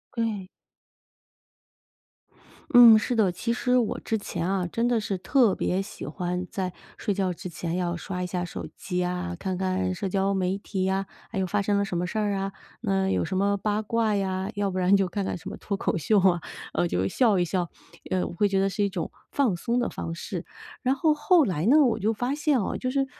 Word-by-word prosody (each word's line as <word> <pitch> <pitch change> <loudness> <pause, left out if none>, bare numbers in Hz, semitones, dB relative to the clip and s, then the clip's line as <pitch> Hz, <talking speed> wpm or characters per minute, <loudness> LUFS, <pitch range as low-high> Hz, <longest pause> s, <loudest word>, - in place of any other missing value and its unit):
对。 220 -5 -2 2.2
嗯， 240 -3 +9
是 240 +3 -1
的， 205 -5 +3
其 230 +6 -2
实 250 +1 +2
我 230 -4 0
之 220 - -1
前 180 -3 -3
啊， 195 -2 0
真 235 +1 +1
的 240 -2 +2
是 205 -3 -2
特 235 0 +3
别 185 +2 0
喜 200 - -8
欢 180 +3 -3
在 185 -2 -3 0.2
睡 205 - -1
觉 190 -2 0
之 180 +1 -7
前 170 0 -4
要 175 -1 -1
刷 180 +1 -4
一 - - -2
下 180 0 -2
手 - - -6
机 180 -1 -2
啊， 180 0 -3
看 190 -1 -3
看 185 0 0
社 195 +2 -3
交 195 +1 +1
媒 190 0 0
体 195 -2 -3
呀， 195 +1 0 0.2
还 - - -5
有 190 - +1
发 205 +3 0
生 200 0 +1
了 200 - +2
什 180 - -3
么 175 +1 -1
事 200 - -4
儿 205 -1 +1
啊， 195 0 -2 0.3
那 195 -3 +1
有 - - +1
什 185 +3 -2
么 200 +1 +2
八 210 +2 0
卦 220 -1 +1
呀， 190 0 -1
要 200 -1 0
不 185 - -4
然 185 +2 +4
就 195 -1 +2
看 195 +2 -3
看 - - -2
什 - - -8
么 - - -7
脱 200 - -3
口 - - 0
秀 200 +6 +3
啊， 180 -2 +4 0.3
呃， 175 - +1
就 95 - 0
笑 215 - +3
一 175 - +3
笑， 175 0 -1 0.4
呃， 185 -1 +1
我 - - -5
会 205 +4 +2
觉 195 -1 +1
得 195 0 +2
是 205 - -1
一 200 - +1
种 180 -4 -4 0.2
放 255 -10 +2
松 235 +7 -1
的 245 - 0
方 165 - -5
式。 - - -5 0.4
然 265 0 +2
后 310 +2 +3
后 315 +3 +4
来 175 -3 -1
呢， 280 +8 +6
我 230 -4 +2
就 220 +2 +1
发 245 +5 -1
现 295 -4 +2
啊， - - -2
就 255 - -2
是 270 +1 +1
195 Hz, 245 characters per minute, -26 LUFS, 180-220 Hz, 2.2 s, 嗯